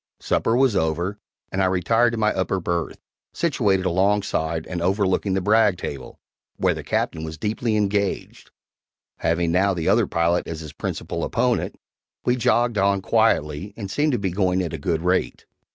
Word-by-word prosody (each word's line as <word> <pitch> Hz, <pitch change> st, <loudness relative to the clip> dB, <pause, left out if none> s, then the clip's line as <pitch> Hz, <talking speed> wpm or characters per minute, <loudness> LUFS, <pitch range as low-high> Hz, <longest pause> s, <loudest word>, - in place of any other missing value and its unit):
Supper 115 Hz, -, +1 dB
was 130 Hz, -5 st, +3 dB
over, 85 Hz, +4 st, -1 dB, 0.3 s
and 95 Hz, -, -1 dB
I -, -, +3 dB
retired 115 Hz, +6 st, +2 dB
to -, -, -2 dB
my 105 Hz, -1 st, +2 dB
upper 95 Hz, 0 st, -1 dB
berth, 85 Hz, -1 st, -2 dB, 0.4 s
situated 105 Hz, -, +1 dB
alongside 95 Hz, -4 st, 0 dB
and 90 Hz, -2 st, -4 dB
overlooking 95 Hz, +1 st, +1 dB
the 95 Hz, -, 0 dB
brag 105 Hz, -1 st, +3 dB
table, 70 Hz, -7 st, -7 dB, 0.4 s
where -, -, +2 dB
the -, -, -7 dB
Captain 80 Hz, -, -1 dB
was 80 Hz, 0 st, -6 dB
deeply 110 Hz, +5 st, -1 dB
engaged, 100 Hz, -1 st, -2 dB, 0.7 s
having 85 Hz, +1 st, 0 dB
now 95 Hz, +2 st, +2 dB
the 85 Hz, -2 st, -3 dB
other -, -, +3 dB
pilot 85 Hz, +1 st, +1 dB
as 80 Hz, -1 st, -5 dB
his 75 Hz, -2 st, -9 dB
principal -, -, -4 dB
opponent. -, -, 0 dB, 0.5 s
We 125 Hz, -, +3 dB
jogged 120 Hz, -2 st, +2 dB
on 100 Hz, 0 st, +2 dB
quietly 95 Hz, -6 st, +1 dB
and 100 Hz, -4 st, -6 dB
seemed 150 Hz, +7 st, +1 dB
to -, -, +2 dB
be 95 Hz, -3 st, -2 dB
going 95 Hz, 0 st, +1 dB
at 85 Hz, -3 st, -4 dB
a 80 Hz, -, -4 dB
good 80 Hz, +2 st, -1 dB
rate. 90 Hz, +1 st, 0 dB
95 Hz, 170 wpm, -23 LUFS, 85-105 Hz, 0.7 s, was